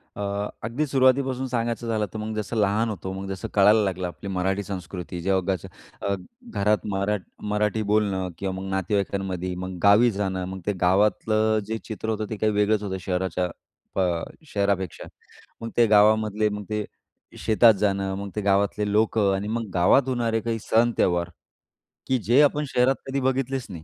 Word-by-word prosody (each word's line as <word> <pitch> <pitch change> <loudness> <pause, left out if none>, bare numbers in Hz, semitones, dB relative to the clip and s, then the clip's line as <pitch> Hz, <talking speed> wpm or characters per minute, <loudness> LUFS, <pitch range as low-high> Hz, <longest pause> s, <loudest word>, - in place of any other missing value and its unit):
अ, - - -6 0.4
अगदी 120 +8 -1
सुरुवातीपासून 130 -1 +2
सांगायचं 120 -1 -2
झालं 110 -2 0
तर - - -5
मग 110 0 -4
जसं 105 +2 -3
लहान 105 +2 +2
होतो, 95 -3 -5
मग 95 +1 -6
जसं 95 +3 -4
कळायला 105 +2 +6
लागलं, 95 -2 -2
आपली 95 +3 -8
मराठी 95 +1 -1
संस्कृती, 90 -2 -6
जेव्हा 95 +1 +1
घरच्या 90 - -10 0.4
अ, 100 - +1 0.4
घरात 105 -1 +1
मरा 100 +2 0 0.4
मराठी 105 +1 +1
बोलणं 100 -3 +1
किंवा 95 +1 -3
मग 95 - -6
नातेवाईकांमध्ये 95 -1 -1
मग 95 0 -5
गावी 105 +4 +6
जाणं, 95 -2 -2
मग 95 +1 -6
ते 105 - 0
गावातलं 110 +3 +2
जे 110 +1 -2
चित्र 110 0 -5
होतं 110 -1 -1
ते 110 - -4
काही 110 +1 +1
वेगळंच 105 +1 +2
होतं 95 -2 -3
शहराच्या 90 0 -1 0.5
अ, 90 -3 +1 0.2
शहरापेक्षा. 100 - -1 0.6
मग 115 - -4
ते 120 - +6
गावामधले 105 0 +4
मग 105 0 -5
ते 105 0 -1 0.5
शेतात 110 +1 +5
जाणं, 95 -1 0
मग 100 +1 -5
ते 105 - -1
गावातले 100 +1 +1
लोकं 105 -1 +2
आणि 100 +2 -3
मग 115 0 -3
गावात 95 +9 +4
होणारे 120 -3 0
काही 115 0 -2
सण 115 +2 +3
त्योहार 85 -1 +1 0.8
की 130 - +2
जे 120 +6 +5
आपण 150 0 +3
शहरात 125 +2 +3
कधी 135 +1 -1
बघितलेच 130 0 -1
नाही. 85 -5 -8
105 Hz, 170 wpm, -25 LUFS, 95-110 Hz, 0.8 s, कळायला